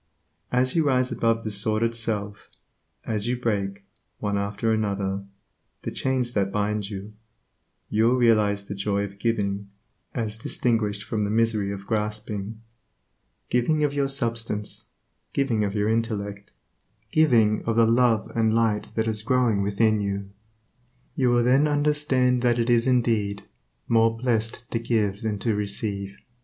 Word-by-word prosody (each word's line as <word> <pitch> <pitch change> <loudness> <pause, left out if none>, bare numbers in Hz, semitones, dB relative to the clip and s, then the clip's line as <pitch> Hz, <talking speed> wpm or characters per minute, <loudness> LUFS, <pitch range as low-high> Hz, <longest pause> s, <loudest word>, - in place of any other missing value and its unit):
As 125 +3 +1
you 165 - +4
rise 130 -3 +2
above 115 0 +1
the 110 - -3
sordid 110 +3 0
self; 105 -3 -3 0.6
as 110 0 -1
you 125 +1 0
break, 100 -4 -2 0.3
one 105 -1 -2
after 100 +3 0
another, 100 -2 -1 0.6
the - - -3
chains 130 -2 -1
that 100 -1 0
bind 105 0 -1
you, 100 -3 -5
will 105 +2 -12 0.8
you 115 +4 +3
realize 105 -4 +3
the 100 - -5
joy 100 0 -1
of 100 0 -8
giving, 100 -3 -1 0.5
as 110 -3 -3
distinguished 110 -4 0
from 105 -1 -2
the 100 - -1
misery 110 -2 +1
of 100 0 -7
grasping 105 0 -3 0.9
giving 150 +6 +2
of 145 -1 +1
your 140 -1 +1
substance; 115 -6 -2 0.5
giving 125 -6 +1
of 100 0 -2
your 105 0 +1
intellect; 105 -3 -2 0.6
giving 115 -9 +4
of 115 - 0
the 115 0 +5
love 115 -1 +2
and 110 -1 +2
light 110 -2 +1
that 110 0 0
is 110 -1 -1
growing 115 -3 +2
within 105 +2 +2
you. 100 -1 -3 0.8
You 130 -2 +2
will 120 0 +3
then 135 +5 +4
understand 145 -4 +2
that 120 -1 +2
it 120 +1 +1
is 120 +1 +3
indeed 110 -5 +1 0.4
"more 115 0 +3
blessed 115 -1 -1
to 115 - 0
give 105 -4 0
than 110 -2 -2
to 110 +3 0
receive." 100 -1 -2
110 Hz, 150 wpm, -25 LUFS, 100-120 Hz, 0.9 s, the